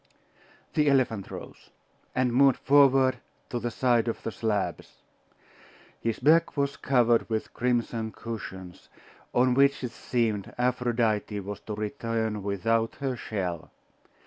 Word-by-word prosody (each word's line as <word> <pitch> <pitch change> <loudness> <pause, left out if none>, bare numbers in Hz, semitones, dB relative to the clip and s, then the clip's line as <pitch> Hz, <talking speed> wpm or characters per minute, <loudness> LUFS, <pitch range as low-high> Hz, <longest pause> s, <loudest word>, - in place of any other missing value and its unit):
The 150 -1 +3
elephant 120 -8 +1
rose, - - -10 0.5
and 125 -1 +1
moved 135 +1 +5
forward 135 -2 +4 0.3
to 120 - -1
the 120 +1 -2
side 120 -1 +2
of 115 - -3
the 115 - -3
slabs. 110 -3 -3 1.0
His 115 -1 -2
back 160 +1 +3
was 140 0 0
covered 120 -4 +2
with 110 -1 -3
crimson 120 -2 -1
cushions, 95 -6 -8 0.4
on 125 +1 +3
which 140 +1 +3
it 125 - -3
seemed 115 -5 -2
Aphrodite 120 -4 0
was 100 +1 -6
to 105 - -6
return 110 -1 -2
without 115 +3 0
her 135 -2 -2
shell. 90 -8 -4
115 Hz, 125 wpm, -27 LUFS, 110-130 Hz, 1.0 s, moved